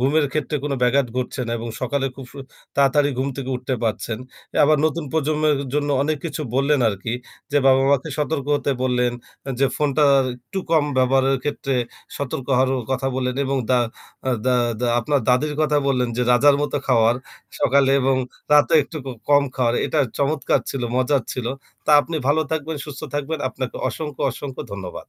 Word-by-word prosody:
ঘুমের 145 +4 +3
ক্ষেত্রে 150 0 -1
কোন 145 - -1
ব্যাঘাত 130 +2 +3
ঘটছে 130 +1 -2
না 115 - -3
এবং 115 +1 -5
সকালে 135 +1 0
খুব 135 - -8
সু - - -11 0.4
তাড়াতাড়ি 140 +1 +4
ঘুম 135 +2 0
থেকে 135 -1 -4
উঠতে 125 +1 -3
পারছেন। 110 0 -2 0.5
আবার 155 +1 +4
নতুন 160 +1 0
প্রজন্মের 155 -1 +1 0.2
জন্য 145 0 0
অনেক 155 +2 0
কিছু 155 -1 -3
বললেন, 140 +1 +2
আরকি। 105 +2 -4 0.4
যে 145 - +4
বাবা-মাকে 135 +2 +4
সতর্ক 150 -2 -1
হতে 145 - -1
বললেন, 125 -1 +1 0.5
যে 135 - +5
ফোনটা 150 0 +1 0.2
আর 135 - +2
একটু 160 +10 -7
কম 155 -3 +4
ব্যবহারের 135 +1 +3
ক্ষেত্রে 140 -2 -2 0.4
সতর্ক 135 -2 -4
হওয়ারও 130 0 +2 0.2
কথা 130 +1 -1
বললেন, 125 -1 -1
এবং 135 0 -1
দা 125 - +5 0.5
আ - - +2 0.2
দা 130 - +4 0.3
দা 125 - +1
আপনার 140 +3 +1
দাদীর 150 +4 +2
কথা 150 -1 +2
বললেন, 125 -2 +1
যে 125 - +1
রাজার 140 +3 +5
মতো 145 - -1
খাওয়ার। 115 -2 +4 0.4
সকালে 135 +1 +4
এবং 135 0 +2 0.4
রাতে 150 +1 +5
একটু 150 - -9
ক - - -3 0.2
কম 145 0 +6
খাওয়ার 120 -2 +1
এটা 155 - -1 0.2
চমৎকার 140 +2 +1
ছিল, 135 - -4
মজার 130 +1 +2
ছিল। 125 -3 -4 0.4
তা - - +2
আপনি 165 +1 -4
ভালো 145 +3 +3
থাকবেন, 160 0 -2
সুস্থ 145 -3 -8
থাকবেন, 145 +2 -2
আপনাকে 130 -1 -5
অসংখ্য, 150 -3 -6
অসংখ্য 135 +1 -6
ধন্যবাদ। 95 -3 -7
135 Hz, 175 wpm, -22 LUFS, 130-150 Hz, 0.5 s, কম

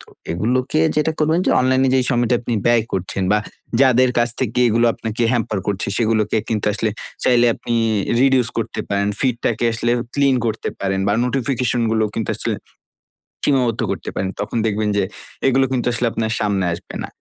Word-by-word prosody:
তো - - -15 0.3
এগুলোকে 125 - 0 0.2
যেটা 155 +1 +2
করবেন 155 +2 +2
যে, - - +3
অনলাইনে 130 +1 +2
যে, - - +4
সময়টা 120 -1 +2
আপনি 120 -1 -2
ব্যয় 120 -2 +4
করছেন 95 +1 -2
বা 105 - +4 0.4
যাদের 130 -1 +5
কাছ 120 0 +3
থেকে 125 -2 -1
এগুলো 115 +1 +3
আপনাকে 115 +1 -4
হ্যাম্পার 110 -4 -1
করছে 100 -2 -1
সেগুলোকে 110 -2 +1
কিন্তু 110 -2 -1
আসলে 110 +1 -1 0.3
চাইলে 120 -1 +4
আপনি 120 - -4 0.5
reduce 130 -2 +3
করতে 115 0 -3
পারেন, 100 0 0
ফিডটাকে 120 -3 0
আসলে 115 +1 0 0.2
ক্লিন 140 -2 +3
করতে 110 -1 -2
পারেন 95 0 -1
বা 100 - +2
নোটিফিকেশন 125 -2 0
গুলো 110 -1 +2
কিন্তু 110 - -3
আসলে - - -2 0.9
সীমাবদ্ধ 125 -5 +1
করতে - - -4
পারেন। 95 - -1
তখন 105 +3 -3
দেখবেন 105 0 0
যে, 100 - +2 0.4
এগুলো 135 0 +3
কিন্তু 125 -2 0
আসলে 120 +1 0
আপনার 110 0 -2
সামনে 100 -3 0
আসবে 85 - -9
না। - - -5
120 Hz, 175 wpm, -20 LUFS, 110-130 Hz, 0.9 s, যাদের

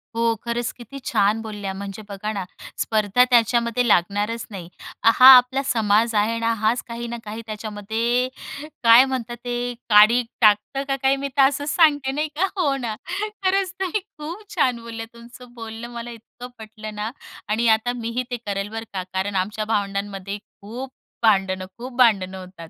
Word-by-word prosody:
हो, 230 0 +2
खरंच 235 0 -2
किती 245 +4 -10
छान 215 0 +2
बोलल्या. 205 -3 -5
म्हणजे 200 +1 -7
बघा 205 +2 -4
ना, 200 -2 -3 0.4
स्पर्धा 215 +2 +3
त्याच्यामध्ये 235 0 +2
लागणारच 205 +4 +1
नाही. 180 -4 -8 0.4
हा 230 +3 +7
आपला 255 +2 +3
समाज 225 -2 +2
आहे 215 +2 +2
ना, 230 0 +1
हाच 225 +2 0
काही 235 0 -5
ना 235 0 -5
काही 215 +2 -7
त्याच्यामध्ये 220 +3 -1 0.6
काय 230 +2 +8
म्हणतात 240 -3 -4
ते 245 0 -2 0.2
काडी 215 +3 +7 0.2
टाकतं 215 +5 +3
का 275 - 0
काय, 270 +1 +4
मी 275 0 -3
तर - - +6
असंच 285 +1 -3
सांगते 290 -5 +4
नाही 300 +3 -1
का? 365 - +2
हो 295 -7 +1
ना. 235 -5 -4 0.5
खरंच 380 0 +1
तुम्ही 385 +2 -1 0.2
खूप 330 +8 -7
छान 255 -7 +2
बोलल्या. 230 -1 -7
तुमचं 240 +1 -14
बोलणं 225 0 -8
मला 235 0 -6
इतकं 235 +2 -11
पटलं 215 -1 -9
ना 210 +2 -3 0.4
आणि 230 +2 +1
आता 225 +2 +2
मी 230 -1 -4
ही 255 - 0
ते 245 - -1
करलं 200 0 -3
बरं 225 0 -5
का, 190 -1 -3
कारण 195 +1 -2
आमच्या 210 +3 -1
भावंडांमध्ये 200 -1 -2 0.2
खूप 245 +6 -7 0.3
भांडणं, 190 -3 +2
खूप 250 +2 -8
भांडणं 195 -7 +3
होतात. 180 -3 -11
230 Hz, 170 wpm, -22 LUFS, 210-245 Hz, 0.6 s, काय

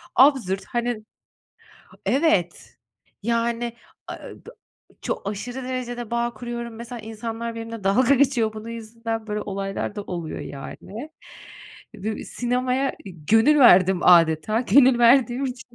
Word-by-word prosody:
absürt, 245 -8 +3
hani 240 -2 -2 1.0
Evet, 255 - 0 0.4
yani, 235 +1 -1 0.3
aaa, - - -6 0.3
dı - - -9 0.5
çok 200 - -3
aşırı 245 +6 -6
derecede 245 -2 -5
bağ 235 0 -1
kuruyorum. 235 0 -6
Mesela, 235 +1 -8
insanlar 225 +1 -5
benimle 225 -2 -7
dalga 250 +7 +4
geçiyor 255 -5 +2
bunun 215 +1 -8
yüzünden. 225 -1 -5
Böyle 210 0 -3
olaylar 195 0 -4
da 205 - -3
oluyor, 170 -5 -5
yani. 210 - -8 0.9
Du 220 0 -2
sinemaya 250 +2 -1
gönül 220 - +3
verdim 190 -7 +6
âdeta 170 +5 +4
Gönül 255 +1 +5
verdiğim 245 +1 +4
için 250 -2 -6
230 Hz, 120 wpm, -23 LUFS, 210-245 Hz, 1.0 s, verdim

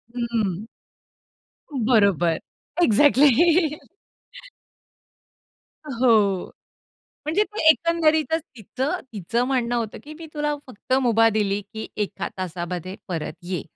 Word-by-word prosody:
हम्म. 220 -5 -2 1.2
बरोबर. 195 - +3 0.4
एक्झॅक्टली. 290 +3 +5 2.6
हो. 225 -8 +2 0.7
म्हणजे 325 +7 +1 0.3
एकंदरीतच 320 +1 +2
तिथं 260 - -3
तिचं 220 +5 -1
म्हणणं 245 -3 0
होतं, 230 -3 -3
की 305 +1 -10
मी 330 - -8
तुला 295 -1 -1
फक्त 255 +1 -5
मुभा 225 -2 +4
दिली, 205 -2 0
की 220 0 -6
1 205 - -3
तासामध्ये 180 0 -5
परत 165 -4 -4
ये. 175 -3 -3
225 Hz, 90 wpm, -23 LUFS, 195-285 Hz, 2.6 s, एक्झॅक्टली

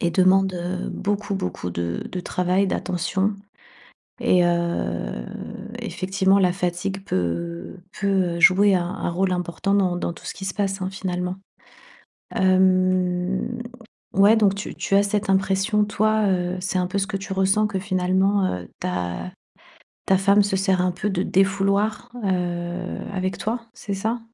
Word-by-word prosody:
Et 170 - +1
demandent, 185 +2 +4
heu, 180 +1 -3
beaucoup 205 0 -2
beaucoup 90 - -4
de 85 0 -3
de 185 - -3
travail, 180 +2 +1
d'attention 190 +3 -1 0.9
et 180 -1 +4
heu, 170 - -1 0.5
effectivement 190 +1 +1
la 185 -2 +4
fatigue 190 +1 -2
peut, - - -2
heu, 170 - -3 0.2
peut, 200 - 0 0.3
heu, - - -5
jouer 195 +3 +6
un 175 -1 0
un 175 - -3
rôle 185 +2 0
important 180 +3 -1
dans 185 -3 +2
dans 175 - -2
tout - - -14
ce - - -4
qui 190 - -7
se 190 - -2
passe 195 -2 -1
hein 185 - -1
finalement. 180 -1 -3 1.0
Hem, 185 +3 +2 0.5
ouais 200 +3 +6
donc 200 -2 +3
tu 200 - -6
tu 195 - 0
as 200 - +5
cette 205 0 -1
impression 195 +2 +2
toi, 215 +1 +1
heu, 180 -1 0
c'est 185 0 -1
un 180 - 0
peu 185 - -3
ce 195 - -1
que 205 -2 -2
tu 195 0 -5
ressens 195 +3 +2
que 200 -2 -3
finalement, 190 +1 +1
heu, 90 -1 -8
ta 90 - -3 0.8
ta 190 - +5
femme 200 +2 +4
se 200 -1 0
sert 190 -1 +2
un 180 0 +1
peu 200 +4 -3
de 185 -1 0
défouloir, 200 +4 +1
heu, 180 -1 -2
avec 185 0 -2
toi, 230 +3 -2
c'est 215 -4 -5
ça? 220 +5 -1
190 Hz, 165 wpm, -23 LUFS, 180-200 Hz, 1.0 s, jouer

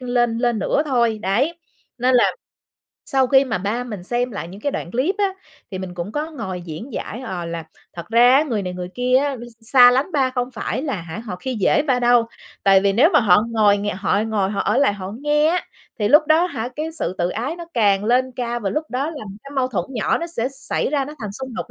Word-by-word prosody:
lên 240 -2 0
lên 240 -2 +1
nữa 250 +8 +1
thôi. 235 -5 +1
Đấy, 265 - 0 0.4
nên 255 +1 +2
là 245 - +6 0.8
sau 265 -1 +2
khi 265 +2 +5
mà 225 -6 -2
ba 210 +6 -2
mình 210 -7 -7
xem 240 +6 -1
lại 200 -6 -6
những 195 +3 -11
cái 285 +5 -2
đoạn 170 - -4
clip 265 - 0
á, 400 -2 +1 0.4
thì 190 - -5
mình 185 -1 -6
cũng 175 +5 -5
có 300 +2 -3
ngồi 190 - -5
diễn 175 - -8
giải, 220 +2 -5
ờ, 185 -9 -5
là 170 -1 -5 0.3
thật 170 - -9
ra 240 +3 +6
á, 285 - +5
người 230 -9 -2
này 180 - -4
người 180 0 -6
kia 250 +1 +2
á 280 0 +1
x 240 -1 -11 0.2
xa 250 -2 +9
lánh 270 +8 0
ba 270 -3 +2
không 250 -1 -2
phải 250 +2 -3
là 285 -3 -2
hả 165 +4 -7
họ 220 -5 -6
khi 255 +8 -4
dễ 220 +7 +2
ba 265 -4 +1
đâu, 240 -1 +4 0.4
tại 195 -1 +5
vì 200 0 +2
nếu 265 - +5
mà - - +6
họ 205 -2 +5
ngồi 210 -3 +4
ng 205 +1 -3
họ 200 +1 +1
ngồi 210 -3 0
họ 200 - -2
ở 210 - +1
lại 280 -6 +3
họ 190 -2 -6
nghe 295 +1 +2
á, 355 +2 +1 0.4
thì 210 -2 +1
lúc 300 +5 +6
đó 315 +1 +5
á 355 - +2
hả 240 -9 -4
cái 315 +2 -3
sự 185 - -3
tự 175 - +1
ái 255 - -3
nó 345 - -7
càng 205 -3 +3
lên 255 +3 +2
cao 240 -1 -2
và 200 -3 -2
lúc 305 +1 -1
đó 270 +5 -1
là 290 -8 -8 0.2
cái 275 - -10
mâu 255 -1 +1
thuẫn 190 -9 -2
nhỏ 235 -5 0
nó 335 - -4
sẽ 255 -8 -2
xảy 275 - -2
ra 285 -2 +1
nó 295 +3 -9
thành 210 -3 -5
xung 260 +3 -7
đột - - -5
240 Hz, 255 wpm, -21 LUFS, 200-270 Hz, 0.8 s, xa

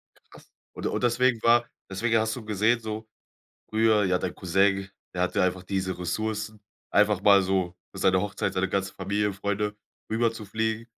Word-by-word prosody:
Ja - - -28
krass. - - -16 0.2
Und - - -7
und - - -2
deswegen 120 -1 +2
war 120 0 +5 0.2
deswegen 115 +4 +1
hast 110 +1 0
du 115 -4 -8
gesehen 110 +3 +2
so, 110 0 -6 0.6
früher 110 -1 +3
ja, 90 -1 +2
dein - - -3
Cousin, 95 +2 +1 0.3
der 90 - 0
hatte 90 +2 +1
einfach 95 0 0
diese 95 -1 -2
Ressourcen, 110 +3 -3 0.3
einfach 105 -1 +3
mal 100 -1 +6
so 90 -2 -1 0.2
für - - -9
seine 95 -1 +3
Hochzeit, 105 0 -2
seine 95 0 0
ganze 100 0 -1
Familie, 100 +2 -1
Freunde 105 +1 -2 0.3
rüberzufliegen. 110 0 -1
105 Hz, 170 wpm, -26 LUFS, 95-110 Hz, 0.6 s, mal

